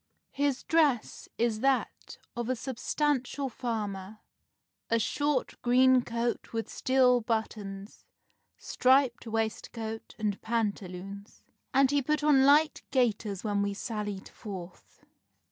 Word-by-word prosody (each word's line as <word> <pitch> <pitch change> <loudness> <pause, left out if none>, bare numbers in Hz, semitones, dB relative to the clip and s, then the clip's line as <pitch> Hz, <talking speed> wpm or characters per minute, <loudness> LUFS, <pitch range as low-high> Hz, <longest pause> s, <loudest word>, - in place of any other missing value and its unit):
His 280 -2 0
dress 300 -8 +1
is 230 -2 +1
that 270 +2 -1 0.2
of 240 0 -3
a 255 - +1
substantial 270 +2 -1
farmer, 215 -4 -4 0.7
a 230 - +3
short 290 +4 -1
green 255 +1 +5
coat 235 0 -3
with 225 0 -2
steel 255 -2 +3
buttons, 210 -3 -4 0.5
striped 260 -2 +2
waistcoat 225 0 -4
and 210 -3 -2
pantaloons, 200 -3 -4 0.3
and 270 0 +4
he 285 0 +3
put 300 +3 0
on 275 -3 +5
light 300 +2 +4
gaiters 215 -6 0
when 205 -2 0
we 200 0 -1
sallied 210 -3 -4
forth." 185 -4 -10
235 Hz, 110 wpm, -29 LUFS, 210-265 Hz, 0.7 s, green